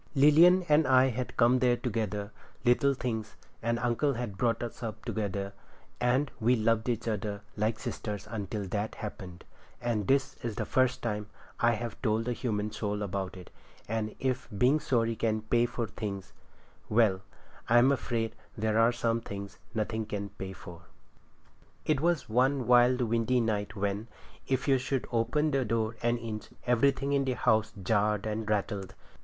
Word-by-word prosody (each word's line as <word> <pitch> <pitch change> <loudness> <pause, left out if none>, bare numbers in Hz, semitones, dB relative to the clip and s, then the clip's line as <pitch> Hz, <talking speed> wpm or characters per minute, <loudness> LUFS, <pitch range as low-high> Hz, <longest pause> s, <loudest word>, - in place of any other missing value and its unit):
Lilian 165 +6 +7
and 150 -1 +4
I 130 0 +5
had 125 +1 -4
come 125 +1 +5
there, 125 -1 +3 0.9
little 140 +3 +4
things, 110 -4 -4 0.3
and 115 +1 0
uncle 120 +4 +1
had 120 -5 -4
brought 115 +2 0
us 120 - -6
up 115 -3 -6
together, 100 -2 -3 0.5
and 130 +4 +2
we 120 +3 +4
loved 115 +1 +1
each 115 0 -2
other 105 -2 -2
like 110 +1 0
sisters 105 -2 -5
until 105 -1 -3
that 105 +3 -2
happened, 95 -4 -8 0.3
and 115 -5 -1
this 135 0 +2
is 115 -3 -3
the - - -2
first 130 -1 +1
time 105 -3 -2 0.3
I 120 0 +4
have 115 -1 -5
told 110 0 0
a 125 - +1
human 105 -4 -2
soul 105 -1 -2
about 95 -1 -3
it; 90 - -12 0.4
and 110 0 -2
if 130 -1 -1
being 130 +8 +4
sorry 115 -5 +1
can 110 -1 0
pay 120 +2 +2
for 120 -1 -3
things—well, 100 +1 -2
but - - -21 0.5
I'm 125 +3 +6
afraid 115 -4 -1 0.2
there 110 +1 +1
are 115 +1 +5
some 115 -1 0
things 100 -2 -7 0.2
nothing 110 0 -2
can 100 -1 -4
pay 95 -1 -7
for. 85 -2 -11 1.0
It 150 -3 +1
was 170 -3 +1
one 130 +3 +2
wild 125 +1 +5
windy 115 +1 +2
night, 105 -3 -1
when, 100 +2 -2 0.4
if 130 +1 0
you 135 -2 +4
should 135 0 -2
open 125 +7 +1
the 135 -2 +2
door 115 -1 -1
an 120 +1 +2
inch, 110 -2 -6 0.2
everything 135 +3 +2
in 140 -1 +3
the 130 - +1
house 110 -3 +2
jarred 105 +1 +1
and 110 0 -3
rattled. 100 -2 -2
115 Hz, 165 wpm, -30 LUFS, 105-125 Hz, 1.0 s, Lilian